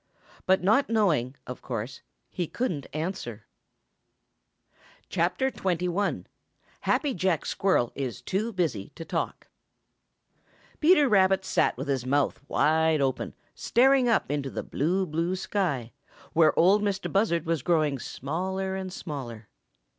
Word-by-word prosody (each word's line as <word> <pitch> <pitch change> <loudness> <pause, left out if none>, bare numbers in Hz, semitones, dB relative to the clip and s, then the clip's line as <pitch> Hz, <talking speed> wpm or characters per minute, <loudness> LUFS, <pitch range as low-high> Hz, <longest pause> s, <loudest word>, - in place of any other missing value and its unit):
But 190 0 +3
not 220 +8 +3
knowing, 165 - +1
of 125 - -7
course 120 +1 -5 0.3
he 175 -3 -2
couldn't 180 - -3
answer. 165 +5 -4 1.7
XI. - - -4 1.6
HAPPY 290 -4 +1
JACK 180 - 0
SQUIRREL 185 -12 +1
IS 130 -4 -5
TO 215 +5 -1
BUSY 155 - -2
TO 165 - -8
TALK - - -3 1.3
|PETER 300 -3 +5
RABBIT 190 -3 +3
sat - - +1
with 135 +3 -5
his 130 -3 -1
mouth 140 0 +1
wide 160 0 +3
open 135 -2 -1 0.2
staring 260 0 +3
up 225 - +1
into 145 -2 -2
the - - -5
blue, 180 +7 0
blue 165 +3 -1
sky, 165 - -2 0.4
where 160 -1 +4
Ol' 190 +5 +5
Mistah 200 -2 -1
Buzzard 190 -5 +1
was 165 -3 0
growing 155 -3 +1
smaller 190 +10 -3
and 190 -1 -5
smaller. 120 - -7
170 Hz, 125 wpm, -27 LUFS, 140-195 Hz, 1.7 s, |PETER